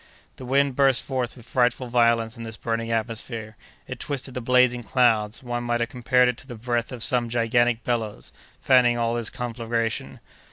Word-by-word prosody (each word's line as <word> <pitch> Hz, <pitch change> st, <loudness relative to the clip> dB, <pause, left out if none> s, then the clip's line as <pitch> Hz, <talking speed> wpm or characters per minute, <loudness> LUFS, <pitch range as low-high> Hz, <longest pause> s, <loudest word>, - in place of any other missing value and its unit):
The 130 Hz, -, -9 dB
wind 135 Hz, +1 st, +2 dB
burst 135 Hz, -3 st, +4 dB
forth 130 Hz, -2 st, -3 dB
with 120 Hz, -, -14 dB
frightful 125 Hz, 0 st, +1 dB
violence 115 Hz, -1 st, +2 dB
in 115 Hz, -, -10 dB
this 110 Hz, -1 st, -7 dB
burning 115 Hz, 0 st, -3 dB
atmosphere; 115 Hz, 0 st, -3 dB, 0.3 s
it 130 Hz, -1 st, -7 dB
twisted 135 Hz, -1 st, -4 dB
the 125 Hz, -, -4 dB
blazing 125 Hz, 0 st, +3 dB
clouds; 115 Hz, -2 st, +1 dB
one 120 Hz, -1 st, -3 dB
might 120 Hz, 0 st, 0 dB
have 120 Hz, 0 st, -1 dB
compared 125 Hz, 0 st, +3 dB
it 125 Hz, -1 st, -1 dB
to -, -, -11 dB
the 120 Hz, -, -8 dB
breath 120 Hz, +1 st, -2 dB
of 125 Hz, -3 st, -3 dB
some 120 Hz, -2 st, +1 dB
gigantic 120 Hz, 0 st, +1 dB
bellows, 110 Hz, -, -3 dB, 0.3 s
fanning 125 Hz, -2 st, +4 dB
all 115 Hz, 0 st, 0 dB
this 120 Hz, -2 st, -1 dB
conflagration. 115 Hz, -1 st, -3 dB
120 Hz, 185 wpm, -24 LUFS, 115-125 Hz, 0.3 s, burst